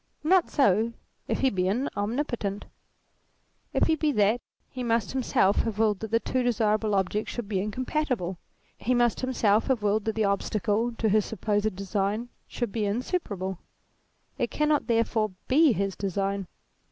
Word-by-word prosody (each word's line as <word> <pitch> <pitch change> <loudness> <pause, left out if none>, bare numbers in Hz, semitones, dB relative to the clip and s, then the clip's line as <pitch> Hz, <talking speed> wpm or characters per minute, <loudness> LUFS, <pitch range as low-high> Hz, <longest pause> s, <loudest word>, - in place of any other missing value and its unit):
Not 355 +2 +4
so 230 - +3 0.3
if - - -1
he 265 -1 +3
be 185 -1 0 0.3
omnipotent. 215 -2 -2 1.1
If - - +2
he 320 - +3
be 305 -1 +1
that, 210 +2 +3 0.3
he 255 - -6
must 230 -3 0
himself 230 -6 +2
have 225 -3 0
willed 215 -3 +2
that 220 - -5
the 230 +1 +3
two 255 +2 -1
desirable 215 -3 +1
objects 195 +3 0
should 240 -4 -5
be 200 -2 -1
incom 210 +6 -2
patible; 250 - -1 0.4
he 250 +2 +1
must 240 -1 +2
himself 225 -5 +2
have 255 -6 +1
willed 210 +1 +1
that 220 -1 -1
the 220 -1 +1
ob 200 -1 +2
stacle 215 +3 0
to 225 - +1
his 215 0 +3
supposed 210 -1 -1
design 200 +4 -2 0.2
should 240 -4 -3
be 215 -1 -1
insuperable. 200 - -2 0.8
It - - 0
cannot 300 -1 +1
therefore 225 -3 +1
be 300 +2 +5
his 195 -2 -1
design. 195 0 -2
220 Hz, 165 wpm, -27 LUFS, 200-245 Hz, 1.1 s, be